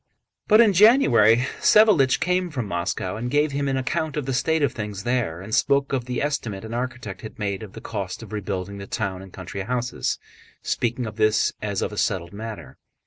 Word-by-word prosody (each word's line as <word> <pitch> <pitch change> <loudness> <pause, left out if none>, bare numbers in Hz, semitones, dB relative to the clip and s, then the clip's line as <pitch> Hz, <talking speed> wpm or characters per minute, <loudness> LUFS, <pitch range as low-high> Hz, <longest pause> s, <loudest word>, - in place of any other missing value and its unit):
But 215 +1 +7
in 215 -4 +5
January 130 - +6
Savélich 200 -12 +5
came 180 0 0
from 130 -7 -3
Moscow 90 +1 -3
and 120 +2 -3
gave 145 +2 +2
him 140 0 -1
an 135 -1 0
account 145 +4 -2
of 145 - -2
the 135 - -2
state 160 +5 +1
of 135 -4 +1
things 105 -4 -5
there, 120 -9 -1
and 105 +3 -8
spoke 140 +4 +2
of 125 -3 -1
the 125 +1 -2
estimate 115 -9 -3
an 110 - -7
architect 120 -5 -4
had 110 - -9
made 100 -2 -2
of 105 -3 -9
the - - -9
cost 100 -1 -5
of 110 - -11
rebuilding 100 -1 -4
the 100 - -8
town 95 -4 -3
and 95 -1 -12
country 95 +1 -7
houses, 125 +3 -2 0.5
speaking 120 +1 -1
of 110 -1 -7
this 110 0 +2
as 100 -2 -2
of - - -2
a - - -8
settled 90 -4 -1
matter. 105 - -8
115 Hz, 205 wpm, -24 LUFS, 100-135 Hz, 0.5 s, But